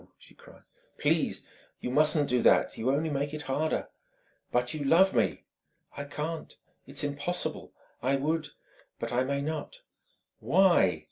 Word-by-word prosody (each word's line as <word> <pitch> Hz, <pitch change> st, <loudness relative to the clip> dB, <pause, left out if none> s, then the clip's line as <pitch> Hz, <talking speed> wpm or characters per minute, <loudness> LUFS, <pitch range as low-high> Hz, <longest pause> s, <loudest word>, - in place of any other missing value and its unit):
she -, -, -16 dB
cried. -, -, -18 dB, 0.3 s
"Please! -, -, +1 dB, 0.3 s
You 125 Hz, -, -4 dB
mustn't 150 Hz, +1 st, +4 dB
do 125 Hz, -1 st, +2 dB
that... -, -, +4 dB
You 115 Hz, +3 st, -1 dB
only 150 Hz, +4 st, +1 dB
make 145 Hz, +1 st, -2 dB
it 150 Hz, -, -6 dB
harder..." 145 Hz, +4 st, -1 dB, 0.6 s
"But 125 Hz, 0 st, +1 dB
you 155 Hz, -2 st, -3 dB
love 175 Hz, +7 st, +5 dB
me!" -, -, +1 dB, 0.5 s
"I 145 Hz, -, -5 dB
can't. 150 Hz, +3 st, -5 dB, 0.3 s
It's 140 Hz, +2 st, -2 dB
impossible. 145 Hz, +5 st, -3 dB, 0.3 s
I 135 Hz, +3 st, +2 dB
would 150 Hz, +3 st, -1 dB, 0.5 s
but -, -, -4 dB
I 125 Hz, +1 st, +2 dB
may 140 Hz, +1 st, -1 dB
not!" 155 Hz, 0 st, -5 dB, 0.6 s
"Why?" 170 Hz, -, +4 dB
145 Hz, 145 wpm, -29 LUFS, 135-155 Hz, 0.6 s, love